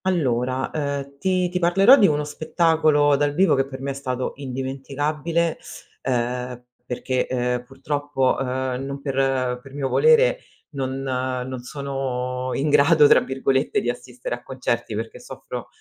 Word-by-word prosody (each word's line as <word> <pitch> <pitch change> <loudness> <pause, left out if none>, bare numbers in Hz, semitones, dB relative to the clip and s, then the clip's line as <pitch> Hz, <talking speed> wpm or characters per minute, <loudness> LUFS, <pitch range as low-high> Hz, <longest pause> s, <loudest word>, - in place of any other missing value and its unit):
Allora, 130 -7 0
ehm, 140 -2 -4
ti 185 0 +1
ti 180 +1 -2
parlerò 195 +8 +6
di 215 -8 +5
uno 150 -1 +1
spettacolo 155 -1 +2
dal 145 0 0
vivo 185 -1 +4
che 135 -1 +1
per 130 -1 -8
me 140 +1 -2
è - - -3
stato 130 -2 -3
indimenticabile, 140 +5 -2 0.4
ehm, 125 0 -2 0.3
perché, 125 +1 -1
ehm, 125 -1 -1
purtroppo, 135 +1 -1
ehm, 130 0 -2
non 140 +1 -5
per 135 -2 0
per 135 +1 -14
mio 135 -2 -2
volere, 475 +2 +4 0.3
non 135 -2 -3
"non 130 -1 -3
sono 130 -2 -3
in 145 +2 0
grado" 150 +2 +6
tra - - +7
virgolette 135 +1 0
di 120 - 0
assistere 125 0 -7
a 120 - -5
concerti 120 -4 -3
perché 110 +1 -5
soffro - - -8
135 Hz, 150 wpm, -23 LUFS, 130-150 Hz, 0.4 s, tra